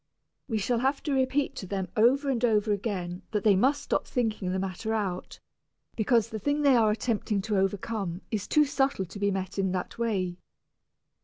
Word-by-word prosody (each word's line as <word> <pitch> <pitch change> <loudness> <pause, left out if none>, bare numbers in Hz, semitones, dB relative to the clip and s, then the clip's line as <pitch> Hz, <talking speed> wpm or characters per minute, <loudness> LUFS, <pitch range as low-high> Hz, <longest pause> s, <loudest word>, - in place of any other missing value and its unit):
We 225 -5 -1
shall 230 +3 0
have 270 +3 0
to 295 - -1
repeat 270 +2 +1
to 190 - -6
them 190 -1 -2
over 260 +6 +4
and 245 -2 -1
over 215 -2 +3
again 190 -4 -2
that 210 -3 -1
they 210 -3 +5
must 275 +8 +2
stop - - -1
thinking 220 -6 -1
the 185 - -1
matter 195 +4 -2
out, 190 -4 -3 0.6
because 230 0 +2
the 220 - -4
thing 290 +5 0
they 275 -2 +6
are 225 -3 +4
attempting 215 -1 0
to 210 -1 0
overcome 195 -1 -2
is 215 -4 -2
too 300 -1 +4
subtle 270 -7 0
to 190 +4 -10
be 200 0 +2
met 190 0 -3
in 190 -1 +1
that 185 +5 -4
way. 185 -6 -1
215 Hz, 190 wpm, -28 LUFS, 190-245 Hz, 0.6 s, they